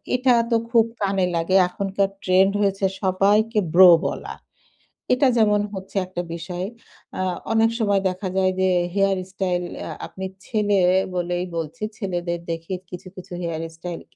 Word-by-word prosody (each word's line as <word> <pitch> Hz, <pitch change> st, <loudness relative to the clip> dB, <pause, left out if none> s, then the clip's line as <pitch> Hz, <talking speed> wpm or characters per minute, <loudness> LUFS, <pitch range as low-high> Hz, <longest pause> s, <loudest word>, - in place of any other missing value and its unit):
এটা 250 Hz, 0 st, +3 dB, 0.2 s
তো 230 Hz, -, +4 dB, 0.2 s
খুব 230 Hz, -2 st, +5 dB, 0.2 s
কানে 195 Hz, -2 st, +1 dB
লাগে। 170 Hz, +3 st, 0 dB
এখনকার 195 Hz, +1 st, -1 dB
ট্রেন্ড 190 Hz, +1 st, +4 dB
হয়েছে 195 Hz, -1 st, +1 dB, 0.2 s
সবাইকে 205 Hz, +4 st, +2 dB
ব্রো 185 Hz, +1 st, +9 dB, 0.2 s
বলা। -, -, -6 dB, 0.8 s
এটা 265 Hz, +2 st, +3 dB
যেমন 210 Hz, -2 st, +4 dB
হচ্ছে 190 Hz, +1 st, -7 dB
একটা 180 Hz, -1 st, -4 dB
বিষয়। 175 Hz, +2 st, -5 dB, 0.5 s
আ -, -, 0 dB, 0.3 s
অনেক 225 Hz, 0 st, +4 dB
সময় 200 Hz, -3 st, +2 dB
দেখা 185 Hz, +1 st, -5 dB
যায় 185 Hz, 0 st, +3 dB
যে 190 Hz, -, +3 dB, 0.3 s
হেয়ার 195 Hz, -1 st, +2 dB
স্টাইল 180 Hz, -2 st, -1 dB, 0.3 s
আ -, -, -5 dB, 0.2 s
আপনি 190 Hz, -, -7 dB, 0.2 s
ছেলে 205 Hz, -3 st, +1 dB, 0.4 s
বলেই 175 Hz, 0 st, -1 dB
বলছি। 165 Hz, +5 st, -5 dB
ছেলেদের 175 Hz, -4 st, -3 dB
দেখি 165 Hz, +2 st, -5 dB, 0.2 s
কিছু, 180 Hz, +2 st, -8 dB
কিছু 185 Hz, -1 st, -10 dB
হেয়ার 165 Hz, -2 st, -3 dB, 0.2 s
স্টাইল 175 Hz, 0 st, -6 dB
190 Hz, 150 wpm, -23 LUFS, 180-205 Hz, 0.8 s, ব্রো